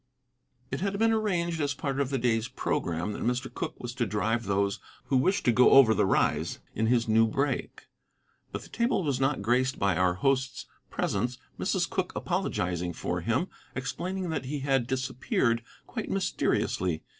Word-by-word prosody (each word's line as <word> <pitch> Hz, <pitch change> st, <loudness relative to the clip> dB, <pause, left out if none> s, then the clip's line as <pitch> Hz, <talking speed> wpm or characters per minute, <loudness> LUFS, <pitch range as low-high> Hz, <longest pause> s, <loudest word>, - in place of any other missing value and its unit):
It 135 Hz, -, -3 dB
had 200 Hz, 0 st, -1 dB
been 225 Hz, +1 st, +3 dB
arranged 175 Hz, -7 st, 0 dB
as 145 Hz, -2 st, 0 dB
part 135 Hz, 0 st, -2 dB
of 140 Hz, -2 st, +1 dB
the 135 Hz, -, 0 dB
day's 115 Hz, -2 st, +1 dB
programme 90 Hz, -7 st, -2 dB
that -, -, -6 dB
Mr. 125 Hz, +2 st, -1 dB
Cooke -, -, -4 dB
was 120 Hz, -1 st, -5 dB
to 120 Hz, -2 st, -1 dB
drive 110 Hz, +3 st, 0 dB
those 100 Hz, 0 st, 0 dB, 0.3 s
who 135 Hz, -, 0 dB
wished 185 Hz, +10 st, +2 dB
to 120 Hz, -, +5 dB
go 125 Hz, +2 st, +6 dB
over 130 Hz, -5 st, +8 dB
the 95 Hz, -, +2 dB
Rise -, -, +1 dB, 0.2 s
in 110 Hz, +1 st, 0 dB
his 120 Hz, 0 st, +2 dB
new 115 Hz, +1 st, +4 dB
brake. 135 Hz, +3 st, -2 dB, 0.7 s
But -, -, -5 dB
the -, -, -14 dB
table 235 Hz, -4 st, +1 dB
was 140 Hz, -5 st, 0 dB
not 135 Hz, -5 st, +1 dB
graced 125 Hz, +4 st, +2 dB
by 100 Hz, -1 st, +2 dB
our 90 Hz, -1 st, +3 dB
host's 130 Hz, +4 st, 0 dB, 0.2 s
presence, 125 Hz, 0 st, -1 dB, 0.2 s
Mrs. 185 Hz, -3 st, +1 dB
Cooke 185 Hz, -2 st, -2 dB
apologizing 90 Hz, -, -1 dB
for 90 Hz, +2 st, -3 dB
him, 115 Hz, -, 0 dB, 0.3 s
explaining 180 Hz, +7 st, -3 dB
that 160 Hz, -, -2 dB
he 145 Hz, +2 st, -3 dB
had 135 Hz, -3 st, +1 dB
disappeared 130 Hz, -2 st, 0 dB, 0.2 s
quite -, -, -5 dB
mysteriously. 85 Hz, -4 st, 0 dB
130 Hz, 175 wpm, -28 LUFS, 110-145 Hz, 0.7 s, over